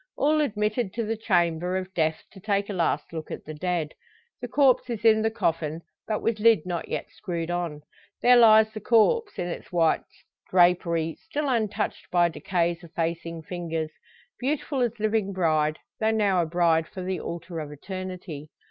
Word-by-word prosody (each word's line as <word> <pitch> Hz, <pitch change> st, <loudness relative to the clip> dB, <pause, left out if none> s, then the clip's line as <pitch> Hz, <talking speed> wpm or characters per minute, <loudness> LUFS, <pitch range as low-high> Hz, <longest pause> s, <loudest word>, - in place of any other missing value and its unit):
All 305 Hz, +1 st, +3 dB
admitted 215 Hz, -4 st, -1 dB
to 230 Hz, -, -1 dB
the 225 Hz, +1 st, -1 dB
chamber 180 Hz, -4 st, +1 dB
of 190 Hz, 0 st, -5 dB
death 160 Hz, -2 st, 0 dB
to 195 Hz, -, -13 dB
take 200 Hz, 0 st, -1 dB
a -, -, -3 dB
last 170 Hz, -2 st, -1 dB
look 160 Hz, -1 st, -6 dB
at -, -, -7 dB
the 155 Hz, -, -6 dB
dead. 165 Hz, -1 st, -2 dB, 0.5 s
The -, -, -4 dB
corpse 265 Hz, -3 st, +3 dB
is 230 Hz, -1 st, -4 dB
in 220 Hz, -1 st, +6 dB
the 220 Hz, -, +2 dB
coffin, 165 Hz, -6 st, -2 dB, 0.2 s
but 215 Hz, -1 st, -2 dB
with 225 Hz, -2 st, 0 dB
lid 220 Hz, -6 st, +4 dB
not 175 Hz, -2 st, -3 dB
yet -, -, -4 dB
screwed 170 Hz, -3 st, -4 dB
on. 170 Hz, -4 st, -3 dB, 0.4 s
There 250 Hz, 0 st, +6 dB
lies 220 Hz, -2 st, +7 dB
the 215 Hz, -, -6 dB
corpse 400 Hz, -, +3 dB
in 175 Hz, -, -2 dB
its 175 Hz, -, -7 dB
white 165 Hz, -3 st, +3 dB, 0.5 s
drapery, 170 Hz, -3 st, +2 dB
still 295 Hz, 0 st, -2 dB
untouched 220 Hz, -5 st, -1 dB
by 175 Hz, -1 st, +3 dB
"decay's 170 Hz, 0 st, -1 dB
effacing 165 Hz, 0 st, -4 dB
fingers," 165 Hz, -2 st, -4 dB, 0.5 s
beautiful 275 Hz, 0 st, -1 dB
as 235 Hz, -2 st, -1 dB
living 215 Hz, -2 st, 0 dB
bride, 155 Hz, -4 st, +1 dB, 0.2 s
though 220 Hz, -, +2 dB
now 205 Hz, -5 st, +2 dB
a 165 Hz, -, -1 dB
bride 165 Hz, -1 st, +2 dB
for 185 Hz, -, -7 dB
the 185 Hz, 0 st, -2 dB
altar 170 Hz, 0 st, -6 dB
of 150 Hz, -1 st, -6 dB
eternity. 180 Hz, -2 st, -7 dB
180 Hz, 175 wpm, -26 LUFS, 165-220 Hz, 0.5 s, lies